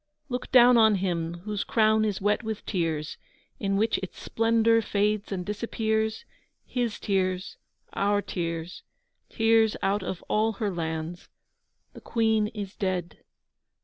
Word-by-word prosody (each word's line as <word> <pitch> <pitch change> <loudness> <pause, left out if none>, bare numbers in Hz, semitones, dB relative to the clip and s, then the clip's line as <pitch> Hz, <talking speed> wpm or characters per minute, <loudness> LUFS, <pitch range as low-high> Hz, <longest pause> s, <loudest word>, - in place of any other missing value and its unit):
Look 250 0 -4
down 245 -1 +7
on 220 -2 +6
him 170 -3 -2
whose 210 -1 -2
crown 220 -1 +3
is 205 -3 -1
wet 205 +1 +1
with 220 -2 -5
tears 160 -5 -2 0.4
In 195 -1 0
which 220 +2 +1
its 190 - -8
splendour 230 0 +2
fades 210 0 0
and 180 -2 -3
disappears 220 +1 -1 0.4
His 240 -4 -2
tears, 185 -2 -1 0.4
our 205 +1 +2
tears, 170 -1 -4 0.5
tears 225 -1 +3
out 200 +1 +1
of 185 -1 -5
all 220 +1 +1
her 210 -1 -2
lands. 160 0 -4 0.6
The - - -12
Queen 220 -2 +1
is 210 -3 -7
dead. 185 -3 -3
210 Hz, 135 wpm, -27 LUFS, 185-220 Hz, 0.6 s, down